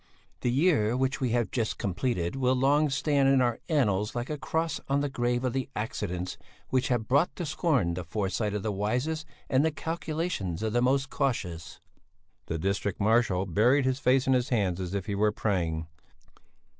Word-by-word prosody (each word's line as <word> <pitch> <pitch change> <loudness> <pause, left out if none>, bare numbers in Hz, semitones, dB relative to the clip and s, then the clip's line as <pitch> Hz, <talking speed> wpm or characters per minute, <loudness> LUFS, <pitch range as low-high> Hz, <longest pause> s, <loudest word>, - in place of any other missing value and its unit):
"The 125 - 0
year 125 -5 +2
which 130 +2 0
we 130 - +1
have 120 -1 0
just 115 -3 -1
completed 95 -1 -1
will 130 -1 +2
long 145 +4 +3
stand 140 0 +2
in 135 -1 +5
our 120 -2 +1
annals 105 - +1
like 120 +4 -3
a 150 - -2
cross 160 +1 -1
on 140 +1 +2
the 145 - -1
grave 120 -1 0
of 130 -2 0
the 135 0 -2
accidents 90 -4 -3 0.3
which 130 +1 +1
have 120 -4 0
brought 140 +6 +2
to 175 - -4
scorn 145 - +1
the 90 +1 -4
foresight 105 +4 -2
of 105 - -3
the 110 - -1
wisest 125 +11 -1 0.2
and 130 +2 +3
the 160 - +3
calculations 155 - -3
of 110 -1 -1
the 120 - +2
most 135 +2 +1
cautious." 90 - -2 0.7
The 80 - -2
district 100 +3 -1
marshal 105 -3 +2
buried 120 - +3
his 130 0 0
face 130 -1 +3
in 135 - +3
his 125 +1 +1
hands 95 -7 0
as 90 +1 -4
if 95 -2 -2
he 100 - -3
were 105 +1 +2
praying. 85 -7 -1
120 Hz, 190 wpm, -28 LUFS, 100-135 Hz, 0.7 s, in